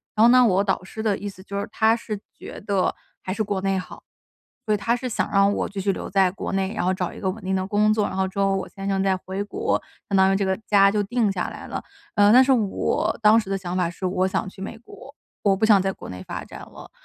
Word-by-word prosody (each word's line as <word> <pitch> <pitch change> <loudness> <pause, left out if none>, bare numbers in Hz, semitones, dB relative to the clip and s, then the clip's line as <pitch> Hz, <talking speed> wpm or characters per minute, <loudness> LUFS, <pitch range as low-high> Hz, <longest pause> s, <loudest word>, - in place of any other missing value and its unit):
然 215 - +4
后 - - +8
呢， 250 +1 +7
我 200 -4 +3
导 195 -2 -1
师 220 +3 -7
的 210 -3 +2
意 205 - -4
思 190 -1 -13
就 200 0 -5
是， 200 - -4
他 220 +1 +3
是 215 -3 -5 0.2
觉 - - -9
得 200 -2 0 0.3
还 185 - -5
是 215 - -1
国 200 -2 -2
内 195 0 0
好， 185 - -10 0.6
所 215 - -1
以 - - +2
他 230 +4 0
是 255 +1 -4
想 - - -1
让 200 0 +4
我 - - -1
继 200 -1 -5
续 195 +1 +1
留 - - -5
在 190 -1 +3
国 190 - -5
内， 195 0 0
然 180 - -1
后 185 - +2
找 180 -2 -3
一 - - -11
个 190 -2 -1
稳 220 +3 -10
定 190 +1 -1
的 185 0 -1
工 210 +2 +2
作， 215 -1 +1
然 - - -6
后 190 0 +1
之 190 - -11
后 195 0 +2
我 195 - -4
先 195 0 -7
生 195 -1 +1
再 190 -1 +2
回 190 +2 -5
国， 410 - -1 0.3
相 200 - 0
当 190 0 +5
于 - - +2
这 195 0 0
个 190 0 +1
家 195 -1 +5
就 210 0 +1
定 220 0 0
下 185 -2 -2
来 - - -9
了。 - - -5 0.3
呃， 205 0 +6
但 255 +3 +8
是 265 - +2
我 220 -7 0
当 215 +2 +7
时 210 -4 -6
的 195 - 0
想 180 -1 -5
法 180 -2 +1
是 175 +2 -6
我 185 0 +1
想 190 0 -2
去 190 0 -11
美 195 - -6
国， 260 +4 -14 0.3
我 200 -2 +3
不 220 - +2
想 210 -3 +6
在 195 +1 0
国 - - -11
内 90 0 -7
发 - - -5
展 - - -11
了。 - - -12
195 Hz, 310 characters per minute, -23 LUFS, 190-215 Hz, 0.6 s, 后